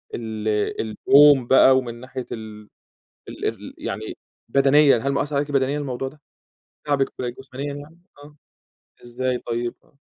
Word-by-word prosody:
ال 110 -2 -5 0.3
اليوم 135 +4 +5
بقى 130 0 +6
ومن 120 -3 -3
ناحية 130 0 -7
ال 105 -2 -8 0.6
ال - - -7
الر - - -4
يعني - - -6 0.3
بدنيًا، 140 +1 +5
هل 140 +4 -1
مأثّر 145 +1 -2
عليكِ 145 +1 -1
بدنيًا 140 +1 +1
الموضوع 135 -2 -4
ده، 150 +2 -12 0.6
تاعبِك 140 -2 0
جسمانيًا 135 +3 -6
يعني؟ 150 +4 -12 0.2
آه، 150 0 -16 0.7
إزاي 125 +1 -2
طيب؟ 120 0 -4
آه. 140 - -31
135 Hz, 135 wpm, -22 LUFS, 120-145 Hz, 0.7 s, بقى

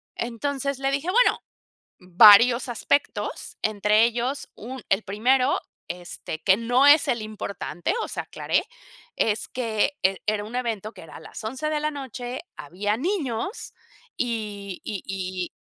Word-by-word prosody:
Entonces, 270 +3 -3
le 270 0 0
dije: 285 +6 -1
"Bueno, - - +4 0.6
varios 215 +7 +7
aspectos, 265 +4 -1
entre 210 +1 +3
ellos 240 +4 -2
un 255 +3 -8
el 195 +3 +2
primero, 250 +7 +2 0.3
este, 175 -2 -6
que 190 -1 +5
no 245 +4 +3
es 295 +1 +7
el 235 -3 0
importante," 200 - -4
o - - -3
sea, - - -4
aclaré, - - -1 0.5
es 215 -1 +1
que 235 +2 -1
e 190 0 +3
era 210 -1 +1
un 230 +3 -8
evento 225 -4 -2
que - - -12
era 165 - -12
a - - -11
las 160 - -10
11 260 +7 -3
de 305 -1 0
la 305 0 0
noche, 255 -2 -6 0.2
había 200 +8 -2
niños, 325 - -3 0.4
y 210 -5 -4
y 205 -3 -5
y 185 -2 -4
230 Hz, 150 wpm, -25 LUFS, 205-265 Hz, 0.6 s, varios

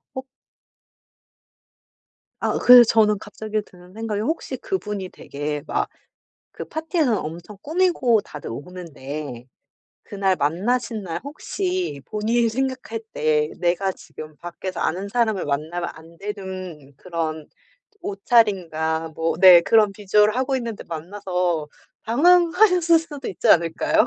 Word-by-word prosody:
어. 260 - -4 2.2
아. - - 0
으 - - 0
그래서 245 0 +9
저는 215 -2 +3
갑자기 215 0 -4
드는 180 0 -17
생각이 215 -1 -3
혹시 320 +9 -3
그분이 210 - -4
되게 145 +1 -5
막 - - -1 0.6
그 - - -7
파티에선 315 - 0
엄청 170 +6 -7
꾸미고 315 - +2
다들 150 -5 -9
오는데 145 -3 -7 0.6
그날 195 -2 0
만나신 215 - -1
날 170 -4 -4
혹시 360 - -3
본인이 230 +2 +1
생각할 255 -2 -3
때 150 0 +1
내가 180 +2 +1
지금 155 -4 -11
밖에서 175 +1 -7
아는 190 +4 -1
사람을 220 -3 0
만나면 160 +5 -2
안 165 +1 -16
되는 185 -7 -7
그런 160 -3 -4 0.5
옷차림과 175 -7 +1
뭐 165 0 0
네 185 -3 +10
그런 215 -1 +4
visual을 210 +2 +2
하고 260 +1 0
있는데 235 -4 -5
만나서 180 -1 -2 0.4
당황하셨을 345 - +4
수도 300 -4 -7
있지 185 - -2
않을까요? 165 +6 +3
195 Hz, 275 characters per minute, -22 LUFS, 165-235 Hz, 2.2 s, 네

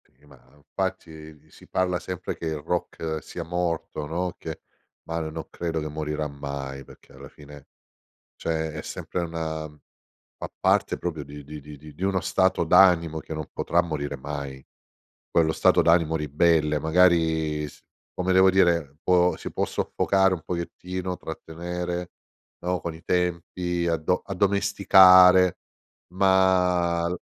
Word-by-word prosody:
Sì, 70 +4 -28
ma 70 -1 -17 0.2
infatti 80 +1 -6
si - - -17
parla 90 -1 0
sempre 90 -1 -5
che - - -7
il 80 -1 -2
rock 80 -1 -3
sia 85 - -7
morto, 85 -3 -3
no, 85 +3 -3
che - - -7 0.4
ma 80 0 -4
l 80 -1 -4
no 80 0 -7
credo 85 -2 -3
che 75 - -4
morirà 75 0 -3
mai, 70 -1 -6
perché - - -18
alla - - -12
fine 75 -1 -14 0.7
cioè 80 -1 -2
è 75 0 -6
sempre 90 - -5
una 80 -2 -4 0.7
fa - - -7
parte - - +2
proprio 80 -4 -4
di 75 +1 -10
di 75 +2 -9
di 75 +1 -12
di 85 - -7
uno 95 -1 +1
stato 95 -2 +1
d'animo 85 -2 +4
che 80 - -8
non 75 -2 -5
potrà 85 - +1
morire 70 -4 -4
mai. 70 -1 -6 0.7
Quello 80 -2 +2
stato - - +4
d'animo 85 -1 +3
ribelle, 75 0 +2
magari 80 -2 +2
s - - -15 0.3
come 90 0 0
devo 95 +1 +6
dire, 85 -6 +2
può 90 -1 +3
si - - -7
può - - -1
soffocare 95 -1 +1
un 90 - -4
pochettino, 90 +1 -4
trattenere, 90 +2 -5 0.5
no, 90 +1 -1
con 85 +1 -5
i 80 - -15
tempi 90 0 -1
addo 85 +2 0
addomesticare, 95 -2 +6 0.6
ma 90 -3 +3
l 90 +1 -3
85 Hz, 145 wpm, -25 LUFS, 75-90 Hz, 0.7 s, devo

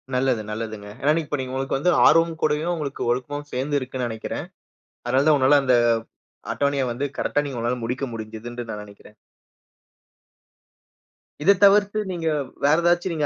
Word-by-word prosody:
நல்லது, 125 -3 +1
நல்லதுங்க. 110 -2 -6
ஏன்னா, 145 - +3
இப்ப 150 0 -3
நீங்க 130 0 -4
உங்களுக்கு 135 0 -1
வந்து 180 +6 +2
ஆர்வமும் 165 0 +4
கூடயும் 155 +3 +1
உங்களுக்கு 145 -4 -5
ஒழுக்கமும் 145 +4 -3
சேர்ந்து 140 +3 0
இருக்குன்னு 130 -1 -4
நெனைக்கிறேன். 110 -1 -5 0.6
அதனால 130 +3 +2
தான் 150 - +6
உன்னால 135 +2 +5
அந்த 125 -1 +4 0.8
அட்டவணைய 140 -1 0
வந்து, 130 +4 -3
கரெட்டா 145 - 0
நீ 140 - -5
உங்களால 120 +2 -1
முடிக்க 125 +4 -2
முடிஞ்சதுன்னு 115 +2 -7
நான் 105 -1 -5
நெனைக்கிறேன். 105 +1 -16 2.3
இதத் 195 +3 +5
தவிர்த்து, 205 +1 +5
நீங்க 165 -2 -3 0.4
வேற 150 +3 +5
ஏதாச்சு 175 +1 +2
நீங்க 155 -3 -1
135 Hz, 150 wpm, -23 LUFS, 120-155 Hz, 2.3 s, தான்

